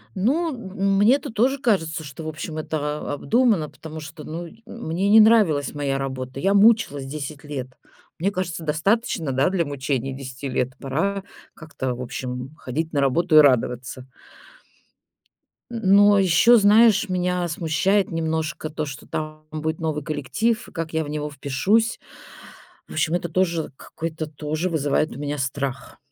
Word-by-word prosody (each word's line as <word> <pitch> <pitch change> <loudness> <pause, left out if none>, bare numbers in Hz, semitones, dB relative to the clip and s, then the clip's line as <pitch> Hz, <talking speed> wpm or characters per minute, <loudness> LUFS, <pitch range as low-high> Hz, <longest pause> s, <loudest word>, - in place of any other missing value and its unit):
Ну, 285 - +1
м 195 -3 -1
мне-то 235 +6 +3
тоже 255 +6 +1
кажется, 165 - 0
что, 145 +2 -9
в - - -6
общем, 155 +1 -6
это 150 -1 -3
обдумано, 215 - +2
потому 160 0 -9
что, 150 0 -9
ну, 170 +2 -6
й 220 +7 -17
мне 195 -3 -2
не 220 +2 +8
нравилась 210 -12 +4
моя 140 -2 -1
работа. 130 -1 -5
Я 195 +6 +2
мучилась 200 -10 +4
10 150 +1 -6
лет. 140 -4 -5 0.5
Мне 195 +5 +1
кажется, 180 -4 -4
достаточно, 160 - 0
да, 135 +6 +2
для 185 -3 +1
мучений 135 -2 -2
10 135 0 -7
лет. 125 0 -1
Пора 190 +9 -1 0.3
как-то, 145 -6 -5
в 125 - -7
общем, 125 +3 -5
ходить 160 +3 -4
на 145 - +1
работу 155 +5 +2
и - - +11
радоваться. 125 -2 +2 1.6
Н 230 -1 -4
но 205 0 +6
ещё, 190 +6 +5
знаешь, 215 0 +5
меня 180 -1 0
смущает 170 +5 +1
немножко 160 -1 -2
то, 155 0 -3
что 140 -1 -8
там 155 0 -5
будет 155 0 -3
новый 155 -2 -2
коллектив, 190 - -1
и - - -14
как 165 -1 -5
я 160 - +1
в 145 - -8
него 150 0 -3
впишусь. 145 - 0 0.9
В - - -9
общем, 155 +2 +1
это 175 -1 -2
тоже 170 -2 0
какой-то 160 -1 -5
тоже 155 +3 -3
вызывает 155 -1 0
у - - -8
меня 145 0 -3
страх. 135 0 -4
160 Hz, 160 wpm, -23 LUFS, 145-195 Hz, 1.6 s, и